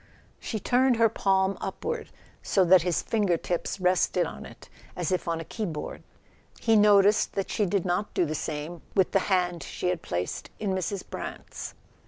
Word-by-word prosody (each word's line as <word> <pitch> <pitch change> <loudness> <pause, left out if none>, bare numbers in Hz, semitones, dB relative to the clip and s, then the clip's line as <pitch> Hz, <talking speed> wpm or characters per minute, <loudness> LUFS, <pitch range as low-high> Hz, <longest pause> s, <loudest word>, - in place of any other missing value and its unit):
She 220 - -4
turned 255 +3 +3
her 225 -1 +4
palm 195 -2 +1
upward, 470 - -4 0.3
so 190 -2 +2
that 180 0 +7
his 175 0 0
finger 205 -6 +1
tips 175 +3 -3
rested 180 -1 +2
on - - -7
it - - -14 0.3
as 175 -2 -2
if 185 - -1
on 165 -1 0
a 165 - -6
keyboard; 170 -9 -5 0.6
he 225 - +3
noticed 205 0 +5
that 195 - -2
she 210 - +1
did 195 0 0
not 185 +4 -1
do 180 - +3
the 155 - -3
same 155 +2 -4
with 190 -3 +3
the 195 - +4
hand 180 -3 +1
she 180 - -3
had 180 -2 -1
placed 90 +1 -4
in 205 -3 -2
Mrs. 190 +1 -2
Brant's. - - -7
185 Hz, 180 wpm, -27 LUFS, 175-205 Hz, 0.6 s, that